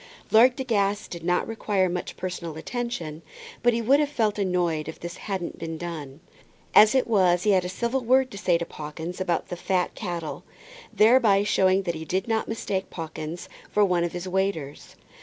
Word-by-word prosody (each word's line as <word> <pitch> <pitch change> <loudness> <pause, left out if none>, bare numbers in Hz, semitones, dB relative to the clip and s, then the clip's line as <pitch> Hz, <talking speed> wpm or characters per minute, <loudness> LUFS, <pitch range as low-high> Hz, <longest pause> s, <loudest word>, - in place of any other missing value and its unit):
Lord 245 +3 +6
De 265 - -3
Guest 205 -4 0
did 170 -2 -7
not 180 +1 +1
require 205 -4 0
much 180 0 -4
personal 175 -3 -5
attention, 175 -7 -4 0.4
but 240 - +4
he 230 0 -1
would 270 +6 +5
have 295 -1 +1
felt 220 -7 0
annoyed 175 -5 0
if 160 - -7
this 170 +1 -7
hadn't 190 -4 -5
been 165 0 -5
done. 155 -4 -7 0.5
As 215 +4 +7
it 260 - +3
was 185 -6 +3
he 210 - +3
had 185 -2 +3
a - - -3
civil 235 +7 -1
word 255 +2 +3
to 200 - -8
say 175 -4 +2
to 170 - -4
Pawkins 160 +4 -7
about 175 -3 -1
the - - -3
fat 180 0 -1
cattle, 170 -6 -5 0.5
thereby 215 -3 +5
showing 190 -1 +3
that 175 -2 -1
he 160 -1 -6
did 185 +4 -1
not 225 -1 0
mistake 200 -4 -3
Pawkins 160 0 -6 0.2
for 210 0 +3
one 180 -3 +1
of 170 - -1
the 175 +1 -5
waiters. 190 -7 -2
185 Hz, 195 wpm, -25 LUFS, 170-220 Hz, 0.5 s, As